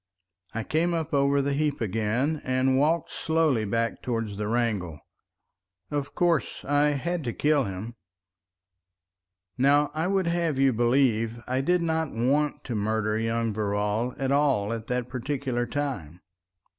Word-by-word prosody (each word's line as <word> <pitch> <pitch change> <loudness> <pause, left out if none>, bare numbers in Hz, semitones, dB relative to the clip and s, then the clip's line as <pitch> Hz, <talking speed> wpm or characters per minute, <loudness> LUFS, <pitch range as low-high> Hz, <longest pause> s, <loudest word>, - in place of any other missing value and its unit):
I 115 - -1
came 170 +6 +1
up 160 -2 -3
over 140 0 +3
the 140 0 0
heap 150 0 0
again, 115 +8 0
and 130 +1 +2
walked 160 +4 +1
slowly 160 -8 +1
back 115 +3 -1
towards 115 -4 -2
the 105 0 -2
wrangle. 105 -9 -1 0.9
Of 145 -1 -3
course 170 -4 0
I 145 +1 +3
had 170 +4 -2
to 120 - -2
kill 145 -3 +2
him.... 100 +4 -6 1.7
Now 145 +2 +4
I 160 +3 -1
would 195 -1 +1
have 170 -4 0
you 135 -1 +4
believe 120 -1 +2
I 130 +1 0
did 175 +4 +2
not 160 -2 0
want 140 +6 +1
to 125 - -5
murder 110 0 0
young 115 0 0
Verrall 105 +3 -1
at 135 0 -1
all 135 -7 +2
at 115 -1 -6
that 125 -1 -1
particular 130 -1 -2
time. 105 - -4
130 Hz, 145 wpm, -26 LUFS, 115-145 Hz, 1.7 s, Now